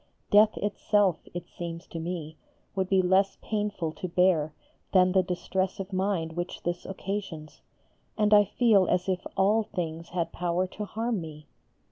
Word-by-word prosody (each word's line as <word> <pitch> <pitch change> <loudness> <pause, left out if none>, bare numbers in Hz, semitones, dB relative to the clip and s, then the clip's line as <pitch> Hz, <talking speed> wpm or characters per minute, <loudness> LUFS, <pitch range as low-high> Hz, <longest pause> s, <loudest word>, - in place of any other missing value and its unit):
Death 210 +1 +6
itself, 205 -3 +1
it 175 0 -6
seems 170 0 -7
to 165 - -7
me, 160 -2 -5 0.4
would 190 -1 -1
be 190 -1 +4
less 190 +2 +3
painful 205 -6 -2
to 185 +3 -6
bear 175 -3 +2 0.4
than 185 -1 +5
the 190 0 +4
distress 185 +1 -2
of 195 0 -6
mind 185 -4 0
which 175 +2 -5
this 175 0 -3
occasions, 190 -5 -5 0.6
and 210 -1 +3
I 205 0 +7
feel 205 -3 +3
as 180 - +1
if 185 -1 -1
all 205 +3 +4
things 170 -5 -5
had 170 -1 -2
power 175 +1 0
to 210 +3 -6
harm 225 -1 -2
me. 155 -2 -9
185 Hz, 160 wpm, -28 LUFS, 170-200 Hz, 0.6 s, I